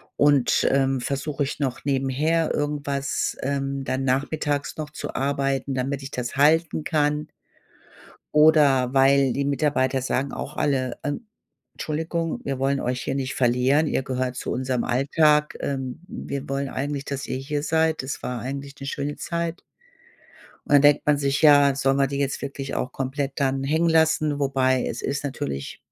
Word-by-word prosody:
Und, 145 -3 +3
ähm, 135 -1 +1
versuch 140 +3 -3
ich 140 +1 -1
noch 135 -4 -2
nebenher 140 +4 +1
irgendwas, 145 -2 -2
ähm, 135 0 -2
dann 135 0 -2
nachmittags 145 +2 -1
noch 155 -1 -4
zu - - -6
arbeiten, 135 0 -1
damit 135 +2 -2
ich 135 +1 -8
das 125 +1 -4
halten 155 +2 +3
kann? 150 -1 0 1.1
Oder 145 -4 +5
weil 135 0 +4
die 140 - -1
Mitarbeiter 140 -2 +1
sagen 135 +1 -1
auch 145 - -6
alle, 130 -3 0
ähm, 145 +10 -4 0.5
Tschuldigung, 165 +1 -2
wir 135 -2 -2
wollen 135 +1 +1
euch 125 0 -2
hier 135 - -2
nicht 135 -1 -2
verlieren, 130 +5 +3
ihr 135 - 0
gehört 130 -1 -2
zu - - -4
unserem 130 -1 -1
Alltag, 150 +4 +2
ähm, 130 -3 -3
wir 140 -7 -6
wollen 135 0 -2
eigentlich, 140 +1 -3
dass 140 -1 -4
ihr 130 - -2
hier 145 +2 -3
seid. 160 0 +1
Das 130 +1 -5
war 125 -1 -3
eigentlich 140 +3 -6
'ne 135 - -6
schöne 145 +1 -3
Zeit. 170 0 -3 1.1
Und - - -2
dann 145 - +7
denkt 145 0 +4
man 150 -1 +4
sich, 140 0 0
ja, 145 -2 +6
sollen 135 0 +2
wir 140 -1 +2
die 140 +1 -3
jetzt 140 -1 -2
wirklich 140 0 -5
auch 125 - -2
komplett 135 +1 -3
dann 135 -1 0
hängen 160 +5 +1
lassen? 160 -2 +2
Wobei 130 -2 +2
es 115 - -4
ist 140 +1 -2
natürlich 135 - -4
140 Hz, 165 wpm, -24 LUFS, 135-145 Hz, 1.1 s, dann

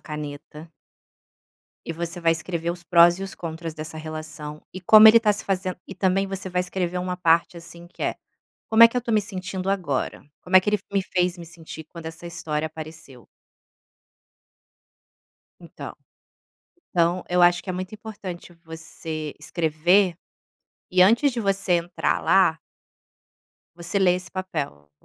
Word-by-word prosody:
caneta 150 +1 -8 1.2
e - - -3
você 170 +1 -5
vai 165 -1 +3
escrever 170 0 -3
os 175 0 -7
prós 175 0 +5
e - - -6
os 195 - -5
contras 165 -1 -6
dessa 155 0 -7
relação, 155 -1 -7
e 185 - -6
como 215 +4 +9
ele 225 +1 +8
tá 215 -2 +3
se 205 - -6
fazendo 185 -1 -2
e 190 - -7
também 195 +1 +1
você 195 -1 -5
vai 180 0 0
escrever 180 -1 -2
uma 180 0 -3
parte 170 -1 +2
assim 170 0 -11
que 175 - -11
é - - -1 0.5
"como 220 +1 +6
é 230 - +11
que 230 - -7
eu - - +2
estou 235 -1 -1
me 215 - +4
sentindo 190 -1 -4
agora?", 170 -10 -2 0.2
como 185 +1 +3
é - - +9
que 190 - -5
ele 210 - +3
f 200 - -25
me 200 -1 +1
fez 180 -1 -1
me 170 - -9
sentir 160 -1 -10
quando 165 +2 -12
essa 165 +1 -8
história 160 -2 -3
apareceu? 155 -5 -10 2.4
Então. - - -9 1.0
Então 175 +1 +1
eu 180 0 +2
acho 175 0 +4
que - - -8
é 185 - -1
muito 185 +2 -5
importante 200 -5 -8
você 160 -1 -6
escrever, 170 +4 +2 0.8
e 180 0 +4
antes 235 +9 +5
de 240 - -4
você 195 -3 0
entrar 175 +1 0
lá 185 -4 +4 1.2
você 175 +3 -2
lê 180 -2 +4
esse 180 0 -9
papel, 150 - -5
175 Hz, 165 wpm, -24 LUFS, 160-190 Hz, 2.4 s, é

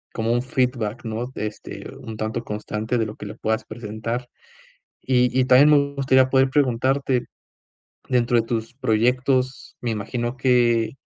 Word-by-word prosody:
como 115 0 0
un 120 +1 +1
feedback, 125 -3 -1
¿no? 115 +3 -4
Este 105 0 -6 0.2
un 110 -1 -6
tanto 110 +2 -3
constante 105 +2 -3
de 110 - +1
lo 105 - -8
que - - -9
le - - -8
puedas 110 0 0
presentar. 115 +2 -5 0.8
Y 125 -1 +3
y - - +5
también, 130 +4 +6
me 140 -1 +3
gustaría 130 -1 +3
poder 135 0 +4
preguntarte 130 -1 +1 0.8
dentro 120 -1 +2
de 115 - +2
tus 115 0 -3
proyectos, 125 +2 0
me 120 - -1
imagino 120 +4 -3
que 120 -3 +3
120 Hz, 150 wpm, -23 LUFS, 110-130 Hz, 0.8 s, también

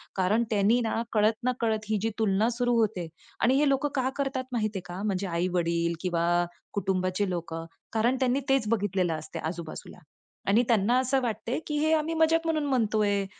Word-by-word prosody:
कारण 200 +5 +2
त्यांनी 215 +3 +3
ना, 225 0 -1
कळत-नकळत 225 +1 +1
ही 215 - +2
जी 225 - +2
तुलना 215 +1 +2
सुरू 245 0 0
होते. 200 -6 0 0.3
आणि 255 +2 +4
हे 290 +2 +3
लोकं 275 +2 +1
का 260 -1 +1
करतात 270 -2 -1
माहिती 215 -4 -1
आहे - - -4
का? 180 +2 -6
म्हणजे 195 -2 -1
आई-वडील 170 -1 0
किंवा 175 -2 0 0.5
कुटुंबाचे 190 0 0
लोकं 165 -2 -4 0.3
कारण 230 +3 +2
त्यांनी 260 0 +2
तेच 270 -5 +2
बघितलेलं 195 -6 +1
असते 155 0 -6
आजूबाजूला. 165 0 -6 0.5
आणि 220 +5 +4
त्यांना 230 +1 +3
असं 260 +1 +1
वाटते 235 +1 -2
की 300 - -2
"हे 310 +1 +2
आम्ही 315 +1 +1
मज़ाक 325 0 +3
म्हणून 310 -2 0
म्हणतोय, 215 -6 +1
220 Hz, 170 wpm, -27 LUFS, 185-255 Hz, 0.5 s, आणि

